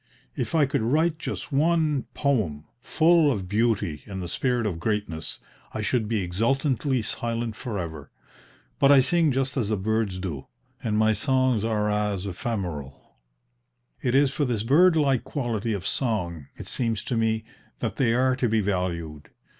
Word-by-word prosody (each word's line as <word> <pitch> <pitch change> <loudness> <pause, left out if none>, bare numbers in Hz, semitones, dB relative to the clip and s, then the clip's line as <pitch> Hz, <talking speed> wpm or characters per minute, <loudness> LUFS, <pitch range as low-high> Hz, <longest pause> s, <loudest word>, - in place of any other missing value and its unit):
If - - -2
I 155 -3 +5
could 140 -2 -1
write 155 +7 +1
just 160 - -5
one 155 -1 +2
poem 100 - 0 0.2
full 160 +1 +4
of 100 -7 -3
beauty 105 -6 0
and 95 -2 -5
the 90 - -4
spirit 120 +5 0
of 90 -6 -2
greatness, 95 -5 -3 0.4
I 110 - -2
should 110 0 0
be 110 -3 0
exultantly 130 - 0
silent 115 +1 -3
for 110 -2 -5
ever; 80 -5 -6 0.7
but 140 - +6
I 140 -2 +8
sing 165 +2 +2
just 135 +1 -1
as 110 -5 0
the 110 - +1
birds 110 -1 -1
do, 85 -8 -5 0.4
and 105 -2 0
my 110 0 +4
songs 130 -1 +1
are 110 -2 0
as 105 -2 -1
ephemeral." 90 - -5 0.9
It 125 0 0
is 140 -1 +4
for 145 - -1
this 120 -6 -1
bird 165 +9 +5
like 135 -6 +2
quality 120 -6 -2
of 100 -3 -3
song, 85 - -1
it - - -8
seems 115 -4 -1
to 125 - -2
me, 110 -1 +1 0.3
that 110 -3 -3
they 125 -4 +3
are 130 +1 +3
to 125 -3 +1
be 110 0 +2
valued. 85 -6 -3
115 Hz, 170 wpm, -25 LUFS, 100-135 Hz, 0.9 s, I